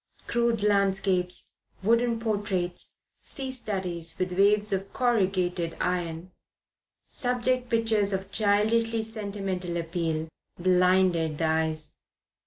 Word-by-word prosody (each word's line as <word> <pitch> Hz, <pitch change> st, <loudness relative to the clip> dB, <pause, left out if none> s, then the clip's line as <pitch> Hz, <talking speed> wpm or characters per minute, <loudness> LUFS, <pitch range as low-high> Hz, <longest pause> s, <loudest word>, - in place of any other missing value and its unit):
Crude 235 Hz, -3 st, +1 dB
landscapes, 195 Hz, -3 st, +1 dB, 0.3 s
wooden 230 Hz, +2 st, +2 dB
portraits, 200 Hz, -5 st, -2 dB, 0.3 s
sea 265 Hz, -1 st, -5 dB
studies 180 Hz, -9 st, -3 dB
with 185 Hz, 0 st, -1 dB
waves 205 Hz, +2 st, +3 dB
of 195 Hz, +1 st, -2 dB
corrugated 185 Hz, -8 st, 0 dB
iron, 175 Hz, -1 st, -2 dB, 0.8 s
subject 250 Hz, 0 st, 0 dB
pictures 225 Hz, -3 st, +2 dB
of 190 Hz, 0 st, -3 dB
childishly 220 Hz, +2 st, +2 dB
sentimental 195 Hz, -5 st, -4 dB
appeal, 165 Hz, -1 st, -2 dB, 0.3 s
blinded 180 Hz, -3 st, +3 dB
the 165 Hz, -, 0 dB
eyes. 160 Hz, -1 st, -1 dB
195 Hz, 95 wpm, -27 LUFS, 175-220 Hz, 0.8 s, waves